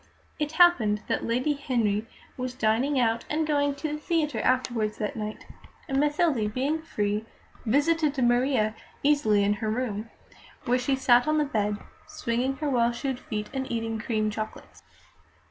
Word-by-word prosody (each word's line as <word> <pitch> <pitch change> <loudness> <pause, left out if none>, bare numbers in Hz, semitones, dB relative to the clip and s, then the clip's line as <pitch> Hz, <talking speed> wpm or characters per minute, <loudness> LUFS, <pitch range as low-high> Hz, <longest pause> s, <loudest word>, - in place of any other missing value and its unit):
It 300 0 -2
happened 250 - +4
that - - -1
Lady 255 +6 +1
Henry 230 -7 0 0.3
was 255 0 -4
dining 255 +4 +1
out 230 -1 +1
and 310 +1 0
going 285 -2 +1
to 285 +2 -4
the 300 - -4
theatre 310 -2 0
afterwards 240 -4 0
that 210 - -3
night, 215 -1 -5 0.4
and 270 0 0
Mathilde, 290 -7 +1
being 290 +5 0
free, 210 -7 -2 0.4
visited 295 +4 +2
Maria 240 -3 +2 0.3
easily 250 -9 +3
in 205 +1 +3
her 220 - 0
room, 220 -2 -2 0.6
where 250 +1 +2
she 270 +2 +1
sat 245 -1 +4
on 310 0 +2
the 300 - +2
bed, 210 -5 -1 0.3
swinging 245 +3 -1
her 300 +2 -3
well 235 -2 +3
shod 255 +1 -3
feet 210 -3 -5
and 265 -1 -3
eating 225 -1 -2
cream 215 -2 -1
chocolates. 215 +1 -7
250 Hz, 160 wpm, -27 LUFS, 220-285 Hz, 0.6 s, happened